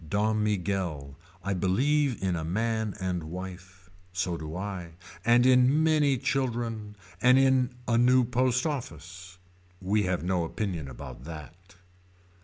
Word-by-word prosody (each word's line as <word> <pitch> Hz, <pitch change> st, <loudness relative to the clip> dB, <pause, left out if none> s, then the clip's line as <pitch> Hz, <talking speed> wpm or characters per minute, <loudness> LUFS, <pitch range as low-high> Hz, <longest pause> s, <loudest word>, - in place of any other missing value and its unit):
Don 105 Hz, +3 st, +1 dB
Miguel. 90 Hz, -9 st, -2 dB, 0.3 s
I 100 Hz, +1 st, -1 dB
believe 125 Hz, +8 st, +1 dB
in 95 Hz, -2 st, +1 dB
a 80 Hz, -, -3 dB
man 110 Hz, +4 st, -1 dB
and 90 Hz, -3 st, -2 dB
wife. 90 Hz, +2 st, -9 dB, 0.2 s
So 90 Hz, -1 st, -1 dB
do 80 Hz, 0 st, -6 dB
I. 95 Hz, -3 st, -5 dB, 0.3 s
And 120 Hz, +1 st, +5 dB
in 130 Hz, +4 st, +5 dB
many 150 Hz, -4 st, +3 dB
children. 115 Hz, -5 st, -2 dB, 0.3 s
And 125 Hz, +1 st, +6 dB
in 130 Hz, -2 st, +3 dB
a 115 Hz, -1 st, +3 dB
new 125 Hz, +1 st, +5 dB
post 125 Hz, +1 st, +1 dB
office. 90 Hz, -, -6 dB, 0.4 s
We 100 Hz, +3 st, +1 dB
have 90 Hz, -2 st, -1 dB
no 90 Hz, -1 st, 0 dB
opinion 85 Hz, -3 st, -3 dB
about 65 Hz, -1 st, -9 dB
that. 85 Hz, +4 st, -11 dB
100 Hz, 135 wpm, -28 LUFS, 90-125 Hz, 0.4 s, And